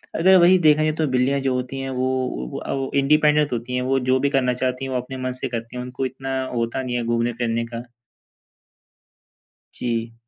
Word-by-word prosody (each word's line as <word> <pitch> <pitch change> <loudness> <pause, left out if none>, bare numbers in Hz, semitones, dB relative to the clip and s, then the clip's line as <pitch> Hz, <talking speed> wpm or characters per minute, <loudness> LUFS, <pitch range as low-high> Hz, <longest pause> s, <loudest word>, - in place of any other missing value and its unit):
अगर 190 +3 +6
वहीं 180 +1 +6
देखा 150 0 +5
जाए 155 - +2
तो 155 -2 +1
बिल्लियाँ 130 +2 +2
जो 135 -1 0
होती 125 +1 -3
हैं 135 0 -4
वो 130 - -2
अ, - - -6
वो 135 -1 -3
इंडिपेंडेंट 150 +1 +3
होती 120 +2 -3
हैं 125 - 0
वो 135 +1 +1
जो 130 - +3
भी 140 - +1
करना 130 -3 +1
चाहती 125 +1 -2
हैं 135 - -5
वो 130 - 0
अपने 130 +1 -8
मन 130 0 -2
से 130 +1 -4
करती 115 0 -5
हैं 125 - -3
उनको 125 +1 -4
इतना 135 0 -3
होता 120 +2 -1
नहीं 125 -1 -3
है 120 - -1
घूमने-फिरने 115 0 -1
का। 115 +1 -4 1.9
जी। 115 -1 -3
130 Hz, 205 wpm, -22 LUFS, 120-135 Hz, 1.9 s, अगर